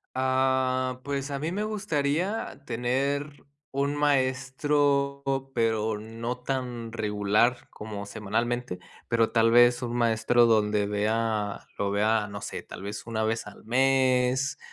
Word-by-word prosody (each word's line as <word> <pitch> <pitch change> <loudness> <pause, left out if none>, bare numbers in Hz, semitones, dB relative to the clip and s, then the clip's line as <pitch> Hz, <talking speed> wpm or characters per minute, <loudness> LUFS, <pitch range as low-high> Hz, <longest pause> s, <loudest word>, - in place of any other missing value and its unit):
Ah, 130 -1 +1
pues, 140 0 -3
a 140 - -2
mí 155 +4 -2
me 205 +3 -2
gustaría 180 -5 -1
tener 135 +4 -2 0.3
un 140 +1 0
maestro, 140 0 +1 0.3
pero 110 -2 +1
no 115 +3 -5
tan 125 -3 -4
regular 105 +2 +1
como 105 -1 -7
semanalmente, 110 +1 -2 0.3
pero 115 -1 +2
tal 115 -1 +4
vez 120 +1 +5
un 120 -1 -3
maestro 120 0 +3
donde 105 -2 +2
vea 105 0 -1 0.2
lo 100 - 0
vea, 105 +1 +2
no 100 0 -7
sé, - - -5
tal - - -10
vez 105 +3 -6
1 110 -1 -1
vez 110 0 -1
al 105 - -13
mes, 130 +1 +2
120 Hz, 130 wpm, -27 LUFS, 110-135 Hz, 0.3 s, vez